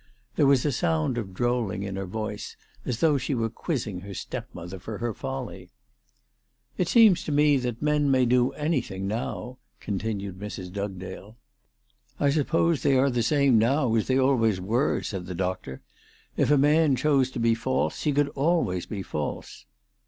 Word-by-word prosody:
There 145 - +4
was 135 -1 +4
a 145 - +2
sound 85 - 0
of 100 -4 -6
drolling 110 -1 -1
in 100 -1 -4
her 95 0 -4
voice, 105 +2 -5 0.3
as 120 -2 -2
though 150 -4 +4
she 130 +2 -2
were 115 -2 -1
quizzing 115 - -3
her 100 +1 -9
stepmother 90 +2 -7
for 105 +3 -6
her 120 0 -2
folly. 65 -7 -6 0.5
" - - -44
It 180 - +1
seems 215 -4 +5
to - - -3
me 145 0 +4
that 125 0 -3
men 150 -1 +2
may 130 -2 +4
do 125 +1 +3
anything 130 - -2
now," 125 +3 -4 0.2
continued 100 -2 -4
Mrs. 95 -3 -7
Dugdale. 100 +1 -6 0.4
" - - -39
I 140 - +3
suppose 160 +1 +1
they 135 -2 +3
are 135 +1 +3
the 120 -1 0
same 140 -1 +3
now 125 +1 +2
as 110 -2 +1
they 130 - +2
always 115 -7 +2
were," 115 +9 0
said 95 -4 -5
the 90 - -5
doctor. 90 -7 -3 0.3
" - - -30
If - - +1
a 145 - +5
man 150 +1 +4
chose 135 0 +2
to 130 - -6
be 115 0 +3
false 130 +3 -1
he 150 - +1
could 145 0 +2
always 140 - 0
be 100 -3 -5
false." 75 -4 -5
120 Hz, 180 wpm, -26 LUFS, 95-140 Hz, 0.5 s, seems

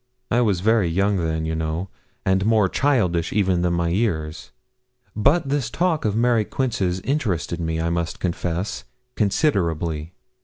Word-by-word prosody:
I 120 - +3
was 100 -7 +1
very 110 -2 +3
young 100 +4 +1
then, 80 -2 -1
you 80 - -2
know, 80 +3 -2 0.4
and 95 0 +2
more 110 -2 +3
childish 90 - +1
even 95 -3 +2
than 90 0 +1
my 85 0 0
years; 85 -6 -1 0.7
but 140 +7 +2
this 140 -5 0
talk 170 0 0
of 105 -1 +1
Mary 115 -1 +3
Quince's 100 -7 -1
interested 100 - -1
me, 80 -1 -2
I 85 +1 0
must 85 -1 -2
confess, 90 +1 -2 0.3
considerably. 85 - 0
95 Hz, 150 wpm, -22 LUFS, 85-115 Hz, 0.7 s, I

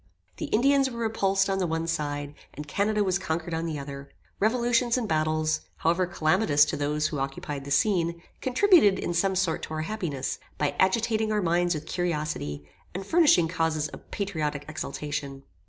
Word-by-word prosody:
The - - -3
Indians 275 +2 +3
were 235 - -8
repulsed 195 -4 +1
on 195 0 0
the 185 - 0
one 160 0 -1
side, 145 -3 -3 0.2
and 150 0 -7
Canada 205 +6 +1
was 190 -1 +1
conquered 165 -1 -3
on 165 +1 -2
the 155 -2 -3
other. 140 0 -7 0.3
Revolutions 240 +2 +2
and 240 -3 -1
battles, 155 -1 +1
however 175 +3 +1
calamitous 155 -2 +3
to - - -3
those 150 +1 0
who 150 - -4
occupied 135 +1 -4
the - - -7
scene, 170 +1 +1 0.2
contributed 260 - +5
in 175 - -2
some 190 +3 +1
sort 185 -3 0
to 155 - -5
our 155 - -2
happiness, 160 -8 -3 0.2
by 145 -1 0
agitating 220 +3 +2
our 210 -2 +1
minds 175 0 +2
with 155 0 -5
curiosity, 150 - -3 0.3
and 190 +1 -4
furnishing 295 - +5
causes 160 -3 -1
of - - -13
patriotic 155 -8 -3
exultation. 145 -2 -5
170 Hz, 170 wpm, -27 LUFS, 150-205 Hz, 0.3 s, contributed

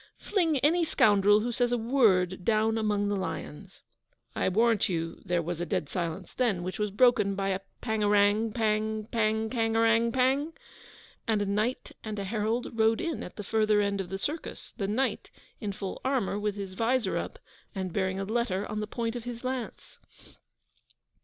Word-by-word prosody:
'Fling 335 -7 +1
any 335 +5 +3
scoundrel 205 -7 +4
who 240 +2 -1
says 245 +1 +1
a 245 - +2
word 200 -7 +2
down 220 +1 +2
among 210 -2 0
the 205 - 0
lions!' 190 -1 -6 0.5
I - - +1
warrant 225 +3 +3
you 165 -2 -3
there 175 -1 0
was 175 +1 -4
a - - -1
dead 145 - -1
silence 170 -3 -4
then, 220 -9 0
which 185 +3 -5
was 210 0 0
broken 210 -2 +3
by 195 0 -1
a 190 0 0 0.2
Pang 220 -2 -1
arang 205 +2 +3
pang 215 -1 0
pangkarangpang, 230 +5 +2 0.7
and 220 -2 +2
a - - -2
Knight 210 +5 -1
and 215 -1 -5
a 200 - -2
Herald 220 +4 -2
rode 225 0 +3
in 335 -2 -2
at - - -8
the 210 - -6
further 215 0 +2
end 200 -1 0
of 180 - -7
the 195 - -3
circus: 300 +11 -5
the 195 - -2
Knight, 245 +7 -1 0.3
in 210 -3 -3
full 195 0 -6
armour, 255 -7 0
with 210 -1 -1
his 195 -2 -6
vizor 230 0 +1
up, - - -4 0.4
and 185 -3 -3
bearing 190 0 0
a - - -1
letter 210 -2 -1
on 210 - -4
the 210 - -3
point 230 +1 -3
of 240 -1 -6
his 240 0 -6
lance. 255 -2 -5
215 Hz, 180 wpm, -29 LUFS, 195-235 Hz, 0.7 s, scoundrel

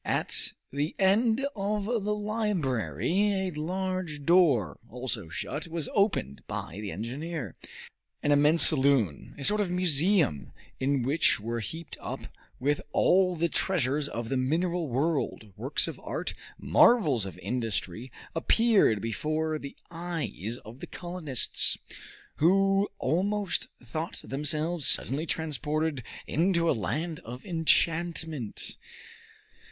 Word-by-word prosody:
At - - 0 0.2
the 145 +3 -2
end 220 +6 +3
of 205 0 -1
the 210 -2 -1
library 190 - 0
a - - -7
large 180 -1 -3
door, 140 - +3
also 125 -7 -5
shut, 145 - -4
was 165 -2 -4
opened 195 - 0
by 95 - -5
the 100 -3 -5
engineer. 135 - -5 0.7
An 145 - +2
immense 150 +3 +7
saloon 130 - +3
a 140 - -7
sort 210 +6 +5
of 195 - -1
museum, 175 - +2 0.3
in 135 -1 +1
which 140 +2 +2
were 115 +2 -3
heaped 160 +8 -7
up, - - -5 0.4
with 145 +3 0
all 180 +2 +3
the 170 +1 +1
treasures 145 -5 0
of 115 -1 -5
the 135 - 0
mineral 165 +6 0
world, 135 - -1
works - - +1
of - - -6
art, - - -4 0.2
marvels 145 - +4
of 95 - -9
industry 115 -1 -3 0.2
appeared 200 - +3
before 155 +7 -2
the 140 - -9 0.2
eyes 165 - -4
of 115 +4 -11
the - - -8
colonists, 175 -8 -2 0.6
who 195 +4 +3
almost 190 +5 0 0.2
thought 155 +7 -4
themselves 150 +4 +1
suddenly 150 +5 +2
transported 155 -1 -1 0.2
into 170 +1 +1
a - - +4
land 150 - -2
of 125 +3 -10
enchantment. 165 - 0
155 Hz, 120 wpm, -28 LUFS, 130-180 Hz, 0.7 s, immense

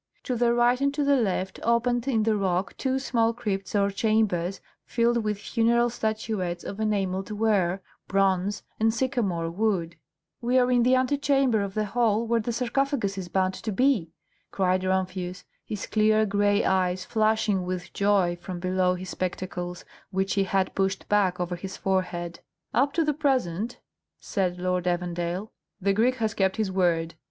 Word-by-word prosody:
To 255 - -2
the 235 0 +2
right 240 +2 +3
and 280 0 +2
to 295 - +1
the 280 0 +4
left 190 -6 -1
opened 240 +1 +1
in 225 -5 +2
the 220 0 +2
rock 190 -1 0
two 265 -1 -1
small 230 -4 +1
crypts 205 -5 -3
or 200 0 +2
chambers 200 -4 +1 0.2
filled 235 -1 +1
with 210 -1 -1
funeral 235 +3 +2
statuettes 215 -6 -2
of 200 - -6
enamelled 195 -3 -1
ware, 200 -4 +1 0.2
bronze, 195 +1 +1 0.2
and 225 +1 +3
sycamore 220 -9 -1
wood. 180 -4 -1 0.4
"We 245 +2 +2
are 250 0 +3
in 245 -1 +4
the 250 +2 +4
antechamber 270 -3 +2
of 195 -1 -4
the 215 0 0
hall 225 +1 +1
where 230 0 +1
the 230 +2 -2
sarcophagus 250 -3 0
is 185 -2 -6
bound 190 0 +1
to 220 - -4
be!" 220 - +2 0.4
cried 185 -1 +1
Rumphius, 185 -1 -2 0.2
his 210 -2 -5
clear 215 0 +3
gray 205 0 +2
eyes 185 -1 +1
flashing 215 -3 +1
with 180 0 -5
joy 195 -4 +2
from 180 0 -6
below 185 0 +1
his 185 0 -7
spectacles, 180 -1 -4 0.2
which 190 0 -1
he 195 -1 +2
had 190 -1 0
pushed 195 0 -1
back 195 -4 +2
over 175 0 -2
his 190 +2 -7
forehead. 180 -3 -2 0.3
"Up 275 +3 +3
to 330 - +2
the 300 - +1
present," 245 - -1 0.4
said 185 -3 -1
Lord 180 0 -1
Evandale, 175 +2 -2 0.3
"the 200 0 +1
Greek 235 +5 +2
has 220 -4 -1
kept 190 0 +1
his 215 -3 0
word. 170 -3 +1
200 Hz, 165 wpm, -26 LUFS, 185-235 Hz, 0.4 s, the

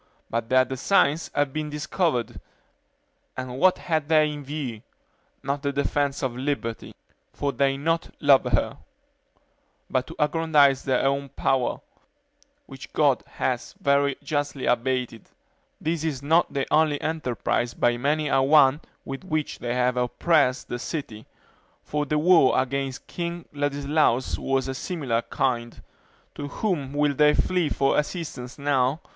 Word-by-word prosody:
but 115 0 -2
their 130 0 +5
designs 140 +4 +1
have 145 -2 +1
been 155 -1 -3
discovered; 150 - -1 1.0
and 130 0 -5
what 185 0 +4
had 155 -4 -1
they 155 -1 +5
in 145 -1 -7
view? 135 -6 -5 0.6
not 140 +1 -2
the 140 - -1
defense 140 0 -1
of 125 -2 -1
liberty; 125 -4 -3 0.4
for 145 - -1
they 135 -1 +2
do 140 - -10
not 165 +1 0
love 140 -3 +5
her; 120 -5 0 1.1
but 130 -1 0
to - - -9
aggrandize 150 -3 +3
their 130 -2 +1
own 140 0 0
power, 135 -1 0 0.9
which - - -11
God - - +3
has - - -2
very 140 -1 +2
justly 145 -2 -2
abated. 125 -2 -1 0.5
This 160 0 -2
is 145 -5 -3
not 160 +4 +3
the 140 -2 -1
only 155 -2 +3
enterprise 125 -6 -2
by 120 0 +2
many 150 +4 0
a 135 -1 +3
one 140 +1 +5 0.2
with 135 +4 -6
which 155 -5 -3
they 120 0 -3
have 125 0 +1
oppressed 130 +2 +1
the 120 - -4
city; 120 -7 -6 0.6
for 150 0 -2
the 150 - +1
war 160 -5 +5
against 135 0 -3
King 170 -1 -5
Ladislaus 145 -2 0
was 135 -1 0
of - - -2
a - - -4
similar 130 -7 -2
kind. 120 -1 -2 0.5
To 145 - -6
whom 145 -4 -2
will 145 0 +2
they 150 +1 +4
flee 180 -4 +1
for 135 +1 +2
assistance 150 -6 -5
now? 140 0 +1
140 Hz, 145 wpm, -25 LUFS, 130-150 Hz, 1.1 s, their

